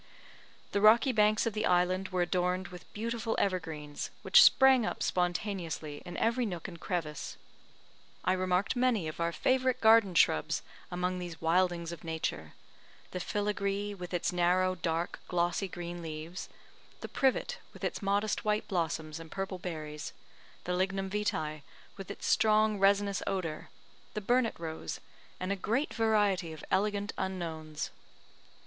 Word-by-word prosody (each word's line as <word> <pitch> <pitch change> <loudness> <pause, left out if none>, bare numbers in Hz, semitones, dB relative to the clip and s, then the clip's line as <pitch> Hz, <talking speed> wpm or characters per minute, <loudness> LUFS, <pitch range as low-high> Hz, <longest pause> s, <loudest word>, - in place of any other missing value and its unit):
The 200 - +1
rocky 230 +5 +6
banks 215 -2 +3
of 230 - 0
the 215 +1 0
island 180 +1 +2
were 185 -1 +1
adorned 180 +1 0
with 180 -1 -12
beautiful 225 +1 -2
evergreens, 160 -6 -2
which - - +8
sprang 265 -2 +7
up - - -2
spontaneously 175 -4 -2
in 175 0 -7
every 235 +2 +1
nook 180 -7 -4
and 170 -3 -9
crevice. 155 -6 -3 0.9
I 185 - +4
remarked 185 +3 +1
many 245 -8 +2
of 155 - -6
our 170 0 +1
favourite 255 +9 +1
garden 220 -5 +6
shrubs 75 - +3 0.3
among 180 +1 -1
these 175 -2 -6
wildings 170 0 +1
of 170 - -8
nature: 160 - -3 0.6
the 180 - -3
fillagree, 205 +1 -1
with 180 -3 -8
its 175 0 0
narrow, 180 +1 +3
dark 170 -1 -2
glossy 175 +2 0
green 175 -1 -6
leaves; 160 +2 -6 0.5
the - - -5
privet, 275 - 0
with - - -14
its - - -2
modest 200 +1 0
white 210 0 0
blossoms 160 -3 -2
and 165 -1 -10
purple 195 0 -4
berries; 155 -4 -5 0.5
the 180 - -2
lignum 190 +1 -1
vitae, 155 -7 -1 0.3
with 195 -2 -9
its - - -6
strong 215 -1 +3
resinous 200 0 +3
odour; 175 -6 -3 0.5
the 210 - -2
burnet 240 +2 +2
rose, 160 -1 -5 0.4
and 185 +1 -2
a - - +1
great 230 +9 -1
variety 205 -6 +2
of 155 - -9
elegant 205 +1 +1
unknowns. 160 -5 -4
185 Hz, 145 wpm, -31 LUFS, 170-210 Hz, 0.9 s, which